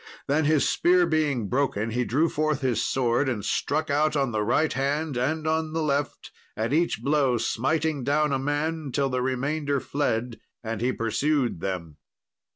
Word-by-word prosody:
Then, 150 Hz, +2 st, +2 dB
his 155 Hz, -1 st, +3 dB
spear 180 Hz, 0 st, +3 dB
being 150 Hz, -9 st, 0 dB
broken, 115 Hz, -3 st, 0 dB
he 125 Hz, +2 st, 0 dB
drew 150 Hz, +9 st, +2 dB
forth 155 Hz, -2 st, -1 dB
his 125 Hz, -4 st, 0 dB
sword 130 Hz, +1 st, +1 dB
and 105 Hz, -6 st, -3 dB
struck 155 Hz, +1 st, -1 dB
out 150 Hz, +2 st, +2 dB
on 135 Hz, -3 st, +1 dB
the 110 Hz, -1 st, -1 dB
right 120 Hz, +9 st, +1 dB
hand 145 Hz, +2 st, -1 dB
and 150 Hz, +6 st, -1 dB
on 160 Hz, 0 st, 0 dB
the 160 Hz, 0 st, -1 dB
left, 145 Hz, -1 st, -2 dB, 0.3 s
at 110 Hz, +5 st, -1 dB
each 170 Hz, +3 st, +1 dB
blow 140 Hz, -4 st, +2 dB
smiting 150 Hz, +5 st, 0 dB
down 150 Hz, +2 st, +1 dB
a 135 Hz, -, +1 dB
man, 145 Hz, +2 st, -2 dB
till 135 Hz, +1 st, 0 dB
the 125 Hz, -1 st, -1 dB
remainder 140 Hz, +3 st, -1 dB
fled, 120 Hz, -5 st, -2 dB, 0.2 s
and 115 Hz, -1 st, -4 dB
he 125 Hz, +2 st, +1 dB
pursued 125 Hz, -, 0 dB
them. 85 Hz, -5 st, -4 dB
140 Hz, 170 wpm, -26 LUFS, 120-155 Hz, 0.3 s, his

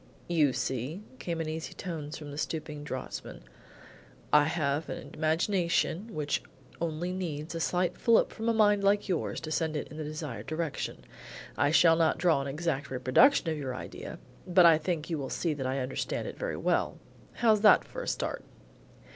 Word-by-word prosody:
"You 155 Hz, -5 st, +3 dB
see," 135 Hz, -, -3 dB, 0.2 s
came 170 Hz, -2 st, -3 dB
in 160 Hz, -, -3 dB
easy 160 Hz, +1 st, -5 dB
tones 160 Hz, -5 st, -5 dB
from 150 Hz, -2 st, -8 dB
the 145 Hz, -, -7 dB
stooping 150 Hz, -1 st, -4 dB
draughtsman, 130 Hz, -, -6 dB, 0.9 s
"I 150 Hz, -1 st, +7 dB
have 150 Hz, -1 st, -1 dB
an -, -, -6 dB
imagination 170 Hz, +5 st, +1 dB
which 150 Hz, -1 st, -1 dB, 0.4 s
only 170 Hz, +2 st, -2 dB
needs 165 Hz, -4 st, -4 dB
a 165 Hz, -, -3 dB
slight 180 Hz, +2 st, 0 dB
fillip 230 Hz, -1 st, +4 dB
from 225 Hz, +1 st, -2 dB
a -, -, +5 dB
mind 205 Hz, -2 st, +4 dB
like 200 Hz, +1 st, +3 dB
yours 180 Hz, -4 st, -1 dB
to 155 Hz, -1 st, -6 dB
send 160 Hz, -1 st, 0 dB
it -, -, -5 dB
in 150 Hz, -, -10 dB
the 155 Hz, -, -3 dB
desired 150 Hz, -8 st, -6 dB
direction. 155 Hz, -1 st, -3 dB, 0.5 s
I 145 Hz, -, +2 dB
shall 165 Hz, +1 st, +6 dB
not 165 Hz, -1 st, +3 dB
draw 170 Hz, -6 st, +3 dB
an 135 Hz, -, -4 dB
exact 150 Hz, -1 st, -2 dB
reproduction 135 Hz, -, +4 dB
of 155 Hz, -, -3 dB
your 130 Hz, -3 st, -4 dB
idea, -, -, -7 dB, 0.3 s
but 180 Hz, 0 st, +6 dB
I 165 Hz, -2 st, +7 dB
think 160 Hz, 0 st, -2 dB
you 160 Hz, -, -1 dB
will 135 Hz, -2 st, -4 dB
see 165 Hz, -3 st, -1 dB
that 135 Hz, -3 st, -3 dB
I 130 Hz, +1 st, -1 dB
understand 130 Hz, 0 st, -2 dB
it -, -, -6 dB
very -, -, -3 dB
well. -, -, 0 dB, 0.4 s
How's 220 Hz, -3 st, +3 dB
that 210 Hz, -, +7 dB
for -, -, -7 dB
a -, -, -6 dB
start?" -, -, -2 dB
160 Hz, 185 wpm, -30 LUFS, 145-180 Hz, 0.9 s, I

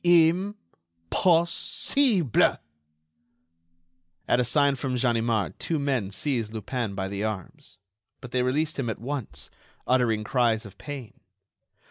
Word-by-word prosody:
"Im 175 Hz, +4 st, +4 dB, 0.6 s
pos 170 Hz, -2 st, +4 dB
sible!" 205 Hz, -, +2 dB, 1.7 s
At -, -, +3 dB
a -, -, +3 dB
sign 140 Hz, +3 st, +3 dB
from 130 Hz, -1 st, -3 dB
Ganimard 115 Hz, -4 st, 0 dB
two 165 Hz, -, -1 dB
men 135 Hz, -8 st, 0 dB
seized 115 Hz, 0 st, -1 dB
Lupin 110 Hz, -1 st, -3 dB
by 95 Hz, 0 st, -2 dB
the 100 Hz, +1 st, -4 dB
arms; 110 Hz, +2 st, -6 dB, 0.4 s
but 125 Hz, -, -10 dB
they 125 Hz, -, +1 dB
released 145 Hz, +5 st, 0 dB
him 120 Hz, -4 st, -1 dB
at 110 Hz, -, -3 dB
once, 130 Hz, 0 st, -5 dB, 0.3 s
uttering 120 Hz, -4 st, +2 dB
cries 115 Hz, -1 st, +1 dB
of 100 Hz, -1 st, -13 dB
pain. 140 Hz, -7 st, -8 dB
125 Hz, 125 wpm, -26 LUFS, 110-150 Hz, 1.7 s, Im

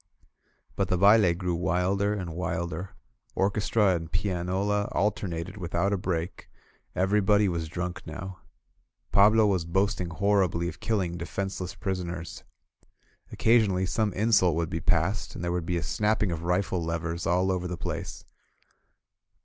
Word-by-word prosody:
But 95 Hz, -, 0 dB
the 90 Hz, -, +1 dB
baUe 100 Hz, -2 st, +5 dB
grew 90 Hz, -1 st, -1 dB
wilder 95 Hz, +4 st, +1 dB
and 90 Hz, -5 st, -5 dB
wilder. 90 Hz, 0 st, -4 dB, 0.4 s
Orchestra 100 Hz, +1 st, +2 dB
and 80 Hz, -2 st, -4 dB
pianola 95 Hz, +2 st, -1 dB
alternated 95 Hz, -3 st, -2 dB
without 90 Hz, +2 st, -1 dB
a -, -, +1 dB
break. 90 Hz, -1 st, -3 dB, 0.5 s
Everybody 105 Hz, +2 st, +3 dB
was 85 Hz, -3 st, -2 dB
drunk 90 Hz, +2 st, -5 dB
now. 90 Hz, +4 st, -7 dB, 0.7 s
Pablo 105 Hz, +2 st, +6 dB
was 95 Hz, -4 st, +1 dB
boasting 95 Hz, +1 st, 0 dB
horribly 90 Hz, -2 st, +1 dB
of -, -, -6 dB
killing 95 Hz, -6 st, -1 dB
defenseless 95 Hz, +1 st, -4 dB
prisoners. 90 Hz, -3 st, -4 dB, 0.9 s
Occasionally, 105 Hz, -5 st, +3 dB
some 105 Hz, +2 st, 0 dB
insult 95 Hz, -5 st, +3 dB
would 85 Hz, +1 st, -1 dB
be 80 Hz, -, -2 dB
passed, 90 Hz, +3 st, 0 dB
and -, -, -6 dB
there 85 Hz, -, -1 dB
would 90 Hz, -2 st, -2 dB
be 90 Hz, -, 0 dB
a 85 Hz, -, -2 dB
snapping 105 Hz, +4 st, 0 dB
of 85 Hz, 0 st, -4 dB
rifle 90 Hz, 0 st, 0 dB
levers 85 Hz, +1 st, -3 dB
all 90 Hz, +2 st, +2 dB
over 90 Hz, -1 st, -2 dB
the 90 Hz, 0 st, -4 dB
place. -, -, -5 dB
90 Hz, 140 wpm, -27 LUFS, 85-100 Hz, 0.9 s, Pablo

